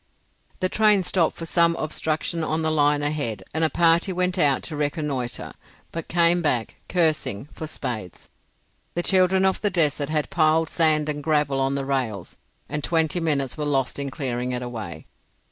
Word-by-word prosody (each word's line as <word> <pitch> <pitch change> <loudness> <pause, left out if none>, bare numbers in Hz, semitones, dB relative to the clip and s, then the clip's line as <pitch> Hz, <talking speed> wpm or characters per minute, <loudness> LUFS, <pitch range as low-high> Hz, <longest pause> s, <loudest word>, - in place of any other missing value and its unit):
The 185 - +2
train 210 -1 +3
stopped 170 0 +1
for 165 - -6
some 170 0 +3
obstruction 160 +1 -2
on 160 +1 -1
the 160 - +1
line 145 -1 +2
ahead 145 -7 -2
and 160 +1 0
a 160 - +3
party 170 +3 +3
went 180 0 0
out 140 -4 +3
to 155 - -6
reconnoitre, 145 -4 -3 0.4
but 165 -1 -5
came 170 +1 +3
back, 125 -8 -1
cursing, 155 - 0
for 155 - -6
spades. 115 - -6 0.6
The 175 - 0
children 190 0 +3
of 190 - +1
the 205 - +2
desert 150 -5 0
had 155 -1 -1
piled 160 0 +3
sand 155 -2 +2
and 150 -1 -3
gravel 150 -2 +1
on 135 +1 +1
the 140 -1 -2
rails, 125 -9 -2 0.3
and 150 -1 -3
twenty 165 0 +1
minutes 145 -4 -1
were 150 - -1
lost 135 -2 0
in 140 -1 -3
clearing 125 -3 -3
it 125 0 -3
away. 105 -10 -7
155 Hz, 175 wpm, -24 LUFS, 135-170 Hz, 0.6 s, train